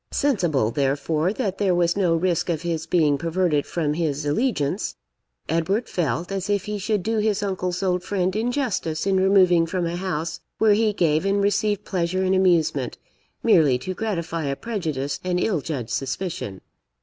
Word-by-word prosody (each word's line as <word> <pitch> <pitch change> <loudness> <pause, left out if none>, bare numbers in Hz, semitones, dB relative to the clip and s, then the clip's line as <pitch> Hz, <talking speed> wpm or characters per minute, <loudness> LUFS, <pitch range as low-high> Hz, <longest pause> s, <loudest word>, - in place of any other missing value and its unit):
Sensible, 175 - +1
therefore, 145 +5 0
that 200 -4 -3
there 190 -3 +2
was 175 -1 +2
no 180 -4 +2
risk 175 0 0
of 165 -1 -1
his 165 -2 -2
being 150 -5 +2
perverted 165 -3 0
from 155 -4 -1
his 150 -3 -1
allegiance, 180 - 0 0.5
Edward 165 +8 0
felt 175 +1 -2
as 195 0 -3
if 205 -2 0
he 210 0 -3
should 205 -1 -1
do 225 +3 0
his 210 -1 +1
uncle's 185 -2 -2
old 180 -1 +1
friend 185 0 -1
injustice 225 - -1
in 195 -1 +2
removing 185 -3 +4
from 180 +1 -1
a 170 +1 -2
house 170 -3 -3 0.2
where 220 -1 +4
he 215 +1 +2
gave 160 -5 +1
and 200 0 +1
received 205 0 +1
pleasure 185 0 -1
and 190 0 +2
amusement, 180 -4 +2 0.5
merely 155 - +5
to 185 +9 -5
gratify 170 -6 -3
a 140 0 -1
prejudiced 155 - -3
and 180 -1 0
ill 180 -5 0
judged 130 -7 -4
suspicion. 135 - -3
180 Hz, 170 wpm, -23 LUFS, 160-200 Hz, 0.5 s, merely